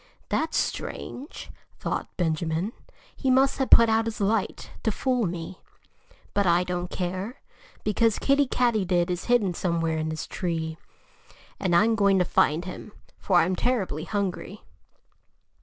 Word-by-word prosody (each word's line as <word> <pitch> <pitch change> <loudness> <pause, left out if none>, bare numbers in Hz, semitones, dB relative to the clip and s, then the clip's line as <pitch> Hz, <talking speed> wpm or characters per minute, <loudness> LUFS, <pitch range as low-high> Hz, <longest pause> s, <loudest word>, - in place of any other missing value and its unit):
"That's 320 0 0
strange!" 275 +5 -4 0.3
thought - - -4
Benjamin. 165 +4 -1 0.4
"He 265 - -1
must 265 +2 +3
have 265 - 0
put 230 - +8
out 225 0 +2
his 225 0 -4
light, 205 0 -1
to 220 - +1
fool 250 -1 0
me. 170 +1 -6 0.7
But 200 -1 +2
I 175 +1 +4
don't 180 0 -3
care, 185 +7 -4 0.4
because 215 +1 +2
Kiddie 280 0 +3
Katydid 190 -9 +1
is 180 0 -3
hidden 230 -7 +2
somewhere 165 -2 -1
in 155 0 -2
this 155 0 -4
tree. 160 -2 -3 0.8
And 180 -3 +1
I'm 220 +6 +5
going 200 -3 +3
to 180 - +3
find 160 +2 +2
him 185 +3 -8 0.3
for 190 - 0
I'm 185 +3 +1
terribly 190 - -1
hungry." 200 +1 -3
190 Hz, 140 wpm, -26 LUFS, 175-225 Hz, 0.8 s, put